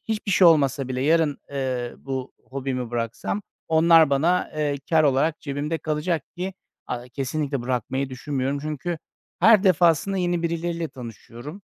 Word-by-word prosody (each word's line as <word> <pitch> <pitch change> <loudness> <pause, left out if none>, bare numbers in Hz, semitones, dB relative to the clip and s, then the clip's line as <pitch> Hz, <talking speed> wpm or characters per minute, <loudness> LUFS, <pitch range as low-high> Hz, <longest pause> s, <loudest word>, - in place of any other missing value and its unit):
hiçbir 215 -2 -2
şey 185 -1 +6
olmasa 140 -4 +3
bile 130 0 -2
yarın, 155 -1 +2
eee, 130 -3 -2
bu 130 -1 -5
hobimi 130 -3 -4
bıraksam 120 - -3 0.3
onlar 160 -1 +6
bana, 170 +6 +2
eee, 145 -2 0
kâr 160 -1 +5
olarak 145 +3 +2
cebimde 145 +3 -3
kalacak 155 0 -1
ki 185 +1 -4 0.3
a 120 0 -4
kesinlikle 140 0 -2
bırakmayı 130 +2 -2
düşünmüyorum. 135 +1 -2
Çünkü 155 +2 -3 0.4
her 220 -3 +7
defasında 180 +1 +3
yeni 175 -2 0
birileriyle 170 0 -2
tanışıyorum. 125 - -10
150 Hz, 140 wpm, -24 LUFS, 130-170 Hz, 0.4 s, her